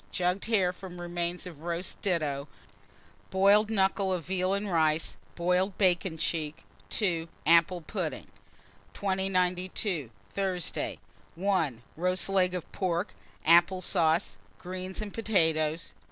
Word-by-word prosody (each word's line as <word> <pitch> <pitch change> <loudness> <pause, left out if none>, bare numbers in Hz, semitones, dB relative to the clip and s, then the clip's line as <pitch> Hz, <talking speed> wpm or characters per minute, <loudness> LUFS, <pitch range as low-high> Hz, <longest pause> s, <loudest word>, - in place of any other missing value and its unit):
Jugged 180 +2 0
hare, 195 -6 +2
from 180 -1 -9
remains 175 +1 -3
of 165 -5 -9
roast 170 +2 -4
ditto; 150 -7 -1 0.8
boiled 200 +3 +5
knuckle 195 -2 +2
of 175 -4 -2
veal 185 +1 +1
and 205 +1 -2
rice; 160 -3 +1 0.2
boiled 180 +2 +1
bacon 180 -3 +2
cheek. 155 -2 -2 0.3
2. 170 -6 0 0.2
Apple 170 +2 +5
pudding. 155 - -4 0.7
2092. 185 - 0 0.2
Thursday. 185 -4 -2 0.4
1. 165 - 0
Roast 185 +3 +1
leg 185 -2 +2
of 180 - -6
pork, 180 0 -1 0.3
apple 170 +3 +6
sauce, 170 -1 +1 0.2
greens, 185 +2 -5
and 205 - -7
potatoes. 160 -8 +1
180 Hz, 115 wpm, -29 LUFS, 170-190 Hz, 0.8 s, apple